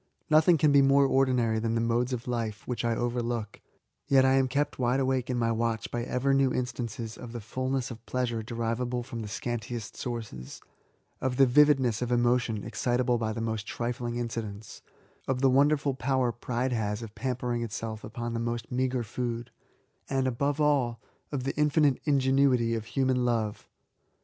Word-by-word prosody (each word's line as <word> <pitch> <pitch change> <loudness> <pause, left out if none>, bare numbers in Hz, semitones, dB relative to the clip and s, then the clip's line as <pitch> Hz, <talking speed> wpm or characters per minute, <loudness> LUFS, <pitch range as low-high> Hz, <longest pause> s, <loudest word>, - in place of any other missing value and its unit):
Nothing 160 +2 +6
can 150 0 +4
be 140 0 +6
more 140 +1 +5
ordinary 125 -5 +2
than 115 0 -1
the - - +2
modes 120 +2 +1
of 125 -1 -4
life 115 -4 -3
whi(^ 125 -1 -2
I 115 -1 +1
overlook, 120 -3 -2 0.5
yet 135 -2 +5
am 135 0 +4
I - - -2
kept 140 +2 -1
wide 125 +1 +2
awake 130 -1 0
in 125 - 0
my 115 -1 +1
watch 115 0 -1
by 120 - -2
ever 135 +2 +1
new 135 -1 +3
instances 120 -3 -4
of 120 -1 -8
the 120 - -4
fulness 130 +3 -2
of 115 -1 -9
pleasure 120 -3 -1
derivable 115 +2 -2
from 120 -1 -7
the 105 - -5
scantiest 115 +1 -4
sources; 110 - -6 0.6
of 130 -1 -1
the 135 - +7
vivid 145 +2 +5
ness 120 -3 0
of 125 0 -2
emotion 120 -3 +1
excitable 120 +2 0
by 110 -1 -1
the 115 - -4
most 110 -1 -3
trifling 120 0 -3
inci 115 -1 -2
dents; 105 0 -9 0.5
of 130 -1 0
the 135 -1 +5
wonderful 140 +1 +3
power 130 -2 0
pride 125 +2 -2
has 105 -1 -2
of 110 -2 -9
pam 130 +1 -2
pering 120 -1 -2
itself 110 -1 -5
upon 120 +2 -5
the 115 - -2
most 115 -1 -3
meagre 125 0 0
food; 120 +1 -4 0.6
and> 135 -1 +1
above 140 +4 0
all, 140 -6 +2 0.3
of 135 -4 -2
the 135 - -2
infinite 150 -2 +3
ingenuity 135 -4 +3
of 110 -1 -3
human 130 +1 +1
love. 115 -3 -1
120 Hz, 185 wpm, -28 LUFS, 115-130 Hz, 0.6 s, the